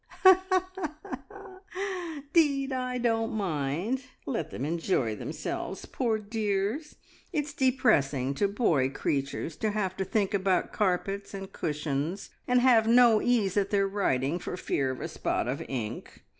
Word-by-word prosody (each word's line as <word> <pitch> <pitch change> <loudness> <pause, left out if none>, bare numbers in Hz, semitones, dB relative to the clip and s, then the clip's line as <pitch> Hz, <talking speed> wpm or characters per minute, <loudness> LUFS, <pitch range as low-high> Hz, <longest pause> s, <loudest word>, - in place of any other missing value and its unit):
"'Deed, 280 -5 +3
I 255 -1 -2
don't 225 -2 0
mind. 180 - -1 0.2
Let 245 - -2
them 130 - -4
enjoy 160 - 0
themselves, - - -5
poor 230 -4 0
dears. 215 +6 -2 0.4
It's 295 -4 -2
depressing 215 - +2
to 200 +8 +1
boy 175 - +2
creatures 140 +3 -2
to 220 - 0
have 200 -3 -1
to 190 - 0
think 200 +1 0
about 190 -2 +1
carpets 200 +1 -1
and 195 -1 -7
cushions, 150 +3 -2 0.2
and 250 0 +4
have 235 -3 +5
no 235 -2 +6
ease 220 -6 +2
at 200 -1 +2
their 200 -1 +2
writing 170 -6 0
for 180 - -5
fear 135 -6 0
of 130 - -4
a - - -2
spot - - -1
of 130 +3 -2
ink. 115 -5 -5
200 Hz, 135 wpm, -29 LUFS, 150-235 Hz, 0.4 s, no